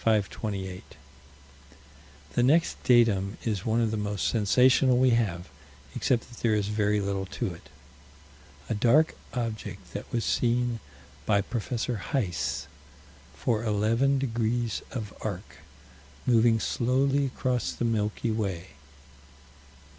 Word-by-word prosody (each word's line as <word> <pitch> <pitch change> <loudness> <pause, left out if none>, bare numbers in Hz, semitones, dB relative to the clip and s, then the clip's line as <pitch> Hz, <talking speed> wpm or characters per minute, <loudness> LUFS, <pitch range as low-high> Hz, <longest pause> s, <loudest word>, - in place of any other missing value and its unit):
The 100 -3 -1 1.6
next 155 +7 +2
datum 110 -5 +3
is 105 -4 -2
one 115 +1 +2
of 115 -2 +1
the 110 - -1
most 105 -1 -1
sensational 125 +4 +4
we 130 0 +4
have, 95 -7 0 0.5
except 120 -3 +1
that 120 - -13
there 110 -2 +2
is 105 -1 0
very 105 0 +1
little 100 -1 -2
to - - -3
it. - - -15 1.0
A - - -1
dark 125 +9 +3 0.2
object 110 -5 -5
that 100 - -7
was 115 -2 -1
seen 120 -1 +1 0.5
by 100 -2 +4
Prof. 115 +2 -4 0.2
Heis, 105 -4 -2 0.7
for 115 -1 0
eleven 115 +6 +2
degrees 120 -3 -1
of 110 -6 -5
arc, 100 -1 -5 0.7
moving 115 -2 +4
slowly 135 +5 +1
across 125 -1 -1
the 120 - -3
Milky 110 0 0
Way. 95 -5 -3
115 Hz, 115 wpm, -27 LUFS, 105-120 Hz, 1.6 s, sensational